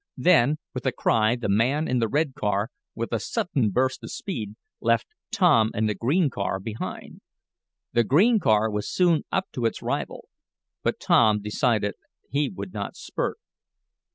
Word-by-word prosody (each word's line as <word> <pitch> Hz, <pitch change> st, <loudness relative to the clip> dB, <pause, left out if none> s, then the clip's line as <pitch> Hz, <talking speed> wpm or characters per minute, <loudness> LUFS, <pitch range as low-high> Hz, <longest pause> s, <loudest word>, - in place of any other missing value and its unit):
Then, 150 Hz, -4 st, +4 dB, 0.2 s
with 130 Hz, 0 st, -4 dB
a -, -, +3 dB
cry 110 Hz, 0 st, +2 dB
the 120 Hz, -3 st, -4 dB
man 125 Hz, +10 st, +2 dB
in 125 Hz, -1 st, +1 dB
the 115 Hz, -, +1 dB
red 145 Hz, +3 st, 0 dB
car, 105 Hz, 0 st, -1 dB, 0.3 s
with 115 Hz, +1 st, -4 dB
a 115 Hz, -, +1 dB
sudden 160 Hz, -, 0 dB
burst 130 Hz, +4 st, 0 dB
of 115 Hz, -, -7 dB
speed, 110 Hz, -, -5 dB, 0.2 s
left 115 Hz, 0 st, +2 dB, 0.3 s
Tom 110 Hz, -1 st, +4 dB
and 110 Hz, +1 st, +1 dB
the 105 Hz, -, 0 dB
green 140 Hz, -, +1 dB
car 100 Hz, -2 st, -2 dB
behind. 110 Hz, +3 st, -7 dB, 0.7 s
The 120 Hz, 0 st, +4 dB
green 205 Hz, -, +4 dB
car 110 Hz, -, +2 dB
was 105 Hz, 0 st, -3 dB
soon 175 Hz, -4 st, +2 dB
up 190 Hz, 0 st, -1 dB
to 120 Hz, -, -3 dB
its -, -, -5 dB
rival, -, -, -3 dB, 0.5 s
but -, -, -1 dB
Tom 105 Hz, -1 st, +4 dB
decided 105 Hz, 0 st, 0 dB, 0.4 s
he 145 Hz, +1 st, +1 dB
would 185 Hz, 0 st, -8 dB
not -, -, -5 dB
spurt. -, -, -3 dB
120 Hz, 165 wpm, -25 LUFS, 110-145 Hz, 0.7 s, Then